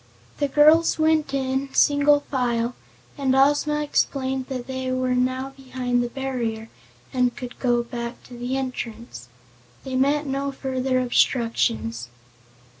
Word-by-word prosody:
The 290 - +2
girls 305 +4 +5
went 315 -2 +2
in, 270 0 -1
single 290 0 +4
file, 245 -4 -1 0.5
and 265 -2 +2
Ozma 290 +2 +3
explained 265 -2 -1
that 255 -3 -5
they 260 -1 -3
were 255 0 0
now 255 +2 -1
behind 255 -2 -2
the 240 - -2
barrier 235 -4 -3 0.4
and 250 -2 +1
could 250 -1 -8
go 240 -2 +2
back 235 0 -6
to - - -14
the 245 +2 -3
entrance. 235 - -6 0.5
They 265 -1 -5
met 285 +3 +2
no 275 0 -2
further 260 -1 -1
obstructions. 120 - +1
260 Hz, 130 wpm, -23 LUFS, 245-275 Hz, 0.5 s, girls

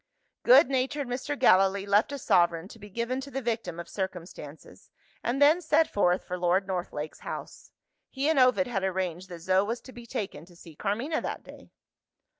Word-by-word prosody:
Good - - +7
natured 270 +1 -1
Mr. 260 +4 -3
Gallilee 195 -1 +4
left 205 +5 +2
a 285 - -4
sovereign 175 -7 +2
to 225 - -13
be 205 0 -11
given 235 +5 -2
to 275 - -8
the 270 - -3
victim 225 -9 -3
of 170 - -7
circumstances 175 -6 -7 0.3
and 245 +3 -1
then 300 +5 +5
set 320 0 +3
forth 180 -2 +1
for 180 0 -5
Lord 180 +2 +2
Northlake's 175 -5 -4
house. - - -8 0.4
He 275 +2 -2
and 315 -3 +3
Ovid 255 +2 +4
had 215 -7 -3
arranged 185 -1 -2
that 170 -2 -9
Zo 185 +2 +2
was 230 +4 -3
to 260 - -13
be 240 -2 -12
taken 190 -9 -5
to 175 0 -19
see 170 -1 -14
Carmina 235 - -2
that - - -5
day. - - -14
205 Hz, 190 wpm, -28 LUFS, 180-260 Hz, 0.4 s, Good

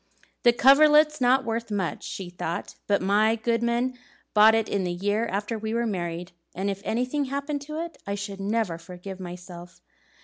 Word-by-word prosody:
"The 240 - +6
coverlet's 300 +4 +5
not 255 +1 +4
worth 230 0 -3
much," 195 -4 -2
she 185 -2 -6
thought; 170 -1 -4
"but 200 -2 +2
my 210 +3 +3
goodman 235 +2 0 0.3
bought 220 +1 +7
it 225 -1 +1
the 190 -4 -1
year 205 +5 0
after 210 +3 -3
we 220 +1 -3
were 235 0 +1
married, 175 -3 -3 0.2
and 195 +2 -1
if 195 0 -6
anything 250 +6 -1
happened 280 +2 -3
to 305 +1 -4
it 335 0 -6
I 200 - -1
should 200 -1 -6
never 200 -4 -1
forgive 180 +2 -9
myself. 175 -1 -9
215 Hz, 170 wpm, -26 LUFS, 190-245 Hz, 0.3 s, bought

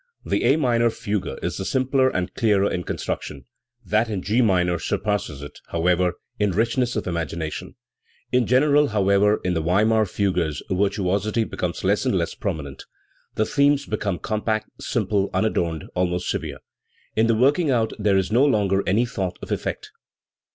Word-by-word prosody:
The - - 0
A - - +5
minor 120 -6 +2
fugue 105 -3 -3
is - - -2
the - - -3
simpler 130 +4 +2
and 90 -7 -3
clearer 105 -4 +2
in 90 - -2
construction; 70 -3 -4 0.4
that 110 +2 +1
in 100 -4 -3
G 110 +6 +2
minor 90 -6 +2
surpasses 90 -9 -2
it, 70 - -10
how 85 0 -3
ever, 90 0 +3 0.3
in 105 -2 +1
richness 120 +4 +1
of - - -2
imagination, 80 -2 -4 0.6
In 125 -3 +2
general, 145 +4 +4
however, 105 -1 +3
in 90 - 0
the 80 - 0
Weimar 105 +6 +2
fugues 90 -7 -1
virtuosity 100 +3 +1
becomes - - -4
less - - +2
and - - +1
less - - -1
prominent. 70 -3 -5 0.5
The 110 - +1
themes 140 +2 +2
become 105 -5 -2
compact, 110 +1 -2
simple, 100 -2 0
unadorned, 85 -5 0
almost 90 0 -1
severe; - - -4 0.6
in 110 +1 +3
the 115 - +3
working 140 +7 +3
out 115 -4 +1
there 100 -2 +3
is 95 +1 0
no 120 +5 +4
longer 100 -8 +2
any 110 +6 +3
thought 95 -7 -3
of - - -7
effect. - - -3
105 Hz, 165 wpm, -23 LUFS, 90-115 Hz, 0.6 s, A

